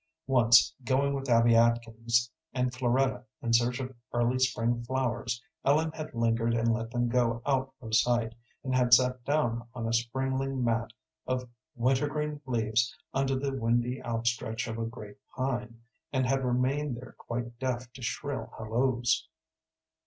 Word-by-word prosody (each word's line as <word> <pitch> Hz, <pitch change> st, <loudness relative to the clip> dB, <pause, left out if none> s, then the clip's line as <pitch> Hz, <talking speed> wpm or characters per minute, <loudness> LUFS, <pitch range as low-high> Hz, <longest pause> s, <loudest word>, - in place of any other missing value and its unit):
Once, 125 Hz, -2 st, +5 dB
going 135 Hz, +2 st, +2 dB
with 135 Hz, -1 st, -4 dB
Abby 115 Hz, 0 st, +5 dB
Atkins 115 Hz, 0 st, +2 dB, 0.2 s
and 125 Hz, -1 st, 0 dB
Floretta 130 Hz, 0 st, +1 dB, 0.2 s
in 115 Hz, -1 st, 0 dB
search 120 Hz, +3 st, +3 dB
of 130 Hz, 0 st, -5 dB, 0.2 s
early 120 Hz, +2 st, +2 dB
spring 120 Hz, -2 st, +1 dB
flowers, 120 Hz, -2 st, -2 dB, 0.2 s
Ellen 155 Hz, +3 st, +3 dB
had 155 Hz, -4 st, -7 dB
lingered 115 Hz, 0 st, +1 dB
and 115 Hz, 0 st, +2 dB
let 115 Hz, 0 st, -3 dB
them 120 Hz, 0 st, 0 dB
go 120 Hz, -1 st, +1 dB
out 135 Hz, -1 st, 0 dB
of 110 Hz, -1 st, -7 dB
sight, 115 Hz, 0 st, +2 dB, 0.3 s
and 130 Hz, -2 st, -2 dB
had 125 Hz, -1 st, +6 dB
sat 125 Hz, 0 st, +1 dB
down 120 Hz, -6 st, 0 dB
on 115 Hz, -2 st, -3 dB
a 115 Hz, -, -1 dB
springing 130 Hz, +2 st, -1 dB
mat 115 Hz, -1 st, 0 dB, 0.4 s
of 125 Hz, 0 st, -1 dB, 0.3 s
wintergreen 145 Hz, +4 st, 0 dB
leaves 115 Hz, -2 st, +1 dB, 0.2 s
under 135 Hz, 0 st, +1 dB
the 135 Hz, +1 st, -2 dB
windy 120 Hz, +1 st, 0 dB
outstretch 115 Hz, -1 st, -1 dB
of 115 Hz, 0 st, -4 dB
a 115 Hz, -, -1 dB
great 105 Hz, -3 st, -9 dB, 0.2 s
pine, 125 Hz, -3 st, -3 dB, 0.3 s
and 130 Hz, -2 st, +1 dB
had 135 Hz, +1 st, +1 dB
remained 130 Hz, +2 st, 0 dB
there 125 Hz, -, -10 dB
quite 120 Hz, 0 st, -5 dB
deaf 125 Hz, -1 st, -3 dB
to 130 Hz, -, -11 dB
shrill 145 Hz, +3 st, -3 dB
halloos. 120 Hz, +2 st, +1 dB
120 Hz, 155 wpm, -29 LUFS, 115-130 Hz, 0.4 s, had